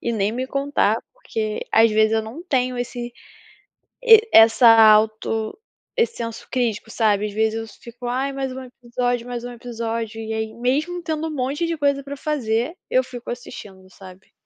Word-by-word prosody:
e 235 - -1
nem 210 0 0
me 255 +2 -3
contar. 280 +1 +1 0.2
Porque, 225 - -4
às 225 0 +5
vezes, 215 +1 +3
eu 220 - +1
não 230 +10 -9
tenho 255 -7 0
esse 240 0 -5 0.9
e 450 -1 +7
essa 225 +2 +7
auto 220 0 +4 0.4
esse 465 0 +1
senso 230 -1 -6
crítico, 230 -3 -2
sabe, 210 -2 +1
às 205 - -6
vezes, 220 0 +1
eu 225 0 -4 0.2
fico: 240 +1 -9
"Ai, 265 +3 -1
mais 270 -1 -3
um 260 0 -7
episódio, 245 -1 -3
mais 245 -1 -5
um 245 - -6
episódio", 230 -2 -5
e 220 0 -5
aí 220 0 -3
mesmo 295 +9 -1
tendo 315 0 -3
um - - -6
monte 280 +5 -1
de 335 -1 -2
coisa 280 -1 +1
para 285 +1 -7
fazer, 260 - -1
eu 255 0 +3
fico 245 -2 -8
assistindo, 195 -6 -9
sabe. 190 0 -15
240 Hz, 180 wpm, -22 LUFS, 220-270 Hz, 0.9 s, e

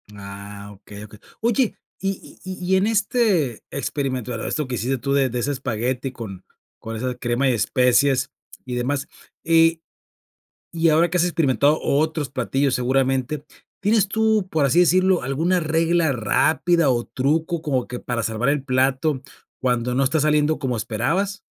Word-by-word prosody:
Ah, 100 0 -9
okey, 100 +1 -12
okey. 105 0 -13 0.2
Oye, 235 +1 +1 0.2
y 195 0 -5
y 185 - -7
y - - -3
y - - +6
en 195 +3 +2
este 205 - +1
experimento, 130 -3 -3
eh, 115 - -4
esto 150 - -1
que 125 - -3
hiciste 130 +3 -1
tú 140 +3 -3
de 135 -2 +2
de 125 0 -3
ese 140 +4 -1
espagueti 130 0 -2
con 100 -6 -8 0.3
con 115 0 -6
esa 125 +3 -2
crema 120 +2 -1
de 125 - +2
especias 125 +5 +2 0.3
y 125 -1 -4
demás, 135 +3 -1 0.4
y 165 0 +4 0.9
y 165 0 +2
ahora 160 +2 +4
que 180 - -1
has 175 - +3
experimentado 150 -3 +2
otros 155 0 0
platillos, 135 +1 0
seguramente, 130 +3 0 0.4
¿tienes 205 0 +2
tú, 220 -2 +1
por 155 -3 +2
así 140 +7 +4
decirlo, 185 +1 +3
alguna 160 +8 0
regla 165 -1 +1
rápida, 155 +7 +2
o, 120 -2 0
truco 160 +5 -1
como 135 -6 -1
que 125 - -6
para 120 -2 -3
salvar 115 +4 -1
el 145 -2 0
plato 130 +2 +1 0.4
cuando 125 -1 0
no 135 +2 +2
está 155 +4 +1
saliendo 150 +1 +2
como 130 -4 -2
esperabas? 135 - -1
140 Hz, 165 wpm, -22 LUFS, 125-165 Hz, 0.9 s, y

